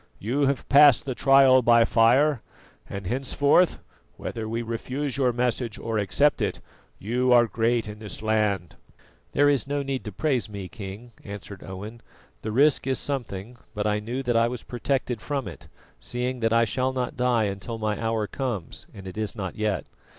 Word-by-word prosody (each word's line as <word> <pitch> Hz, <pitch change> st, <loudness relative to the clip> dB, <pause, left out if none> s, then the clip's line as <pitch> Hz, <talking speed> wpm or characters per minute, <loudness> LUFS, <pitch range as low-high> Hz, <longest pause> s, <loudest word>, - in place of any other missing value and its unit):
You 135 Hz, +7 st, 0 dB
have 140 Hz, -1 st, -1 dB
passed 145 Hz, -2 st, +6 dB
the 135 Hz, -, -2 dB
trial 135 Hz, 0 st, +6 dB
by 115 Hz, -1 st, +5 dB
fire, 125 Hz, +4 st, +3 dB, 0.5 s
and 100 Hz, -1 st, -6 dB
henceforth, 140 Hz, -, +2 dB, 0.4 s
whether 110 Hz, -1 st, -5 dB
we 115 Hz, +1 st, -2 dB
refuse 130 Hz, +5 st, -3 dB
your 130 Hz, -3 st, +2 dB
message 120 Hz, -2 st, -1 dB
or 115 Hz, -1 st, -2 dB
accept 140 Hz, +9 st, +2 dB
it, -, -, -1 dB, 0.4 s
you 125 Hz, +5 st, 0 dB
are 120 Hz, -1 st, +7 dB
great 115 Hz, 0 st, 0 dB
in 105 Hz, 0 st, -8 dB
this 105 Hz, 0 st, -6 dB
land." 105 Hz, -5 st, 0 dB, 0.6 s
"There 145 Hz, +1 st, +4 dB
is 140 Hz, -2 st, +2 dB
no 145 Hz, 0 st, -1 dB
need 135 Hz, -1 st, -3 dB
to 105 Hz, -, -5 dB
praise 130 Hz, +1 st, -1 dB
me, 100 Hz, -3 st, -6 dB
King," 110 Hz, +2 st, -9 dB
answered 100 Hz, -1 st, -9 dB
Owen. 105 Hz, +5 st, -8 dB, 0.4 s
"The 110 Hz, -, -4 dB
risk 135 Hz, +3 st, +3 dB
is 130 Hz, -1 st, +1 dB
something; 120 Hz, -4 st, -4 dB, 0.2 s
but 105 Hz, 0 st, -2 dB
I 105 Hz, 0 st, +1 dB
knew 120 Hz, +5 st, -4 dB
that 120 Hz, -2 st, 0 dB
I 115 Hz, 0 st, +4 dB
was 120 Hz, 0 st, -5 dB
protected 125 Hz, -2 st, -2 dB
from 140 Hz, -4 st, -3 dB
it, -, -, -10 dB, 0.3 s
seeing 125 Hz, +1 st, -3 dB
that 115 Hz, -1 st, +1 dB
I 115 Hz, 0 st, +4 dB
shall 130 Hz, +5 st, -1 dB
not 125 Hz, -1 st, -3 dB
die 125 Hz, -2 st, +2 dB
until 100 Hz, +3 st, -4 dB
my 110 Hz, -1 st, -2 dB
hour 115 Hz, -1 st, 0 dB
comes, 115 Hz, -6 st, -5 dB
and 95 Hz, -, -10 dB
it 95 Hz, +3 st, -7 dB
is 110 Hz, 0 st, -3 dB
not 95 Hz, -5 st, -4 dB
yet. 105 Hz, -2 st, -1 dB
120 Hz, 180 wpm, -25 LUFS, 105-130 Hz, 0.6 s, are